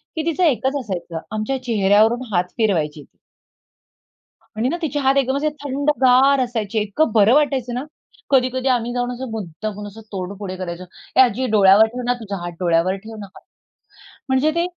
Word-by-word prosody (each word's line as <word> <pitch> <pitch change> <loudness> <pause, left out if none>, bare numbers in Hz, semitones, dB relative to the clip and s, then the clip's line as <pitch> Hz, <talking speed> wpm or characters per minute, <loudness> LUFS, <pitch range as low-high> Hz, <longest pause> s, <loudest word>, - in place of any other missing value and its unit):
की 320 -1 -2
तिचं 335 +2 0
एकच 270 -3 +1
असायचं. 180 -7 -5
आमच्या 215 +5 -2
चेहऱ्यावरून 220 +1 +3
हात 180 0 0
फिरवायची. 160 - 0 1.5
आणि 235 +4 0
ना 340 - -1
तिचे 295 -2 -1
हात 270 0 +2
एकदम 270 0 +1
असे 305 +2 0 0.2
थंडगार 275 -1 +3
असायचे. 225 -4 -2
इतकं 215 +8 0
बरं 220 +2 +5
वाटायचं 270 -5 +1
ना. 250 - -3 0.5
कधी-कधी 260 0 +2
आम्ही 240 -1 0
जाऊन 245 0 -1
असं 250 -1 -6
मुद्दामून 210 +1 -6
असं 205 +2 -11
तोंड 185 0 -4
पुढे 185 -2 -6
करायचो, 180 -1 -6 0.3
"ए - - +7
आजी, 255 0 +3
डोळ्यावर 200 +2 +6
ठेव 250 - -4
ना 245 - +2
तुझा 205 -3 -5
हात, 175 - -5
डोळ्यावर 175 +1 +1
ठेव 225 - -8
ना 205 - -7
हात." - - -15 0.9
म्हणजे 265 +4 +2
ते 340 - +1
235 Hz, 170 wpm, -20 LUFS, 200-265 Hz, 1.5 s, ए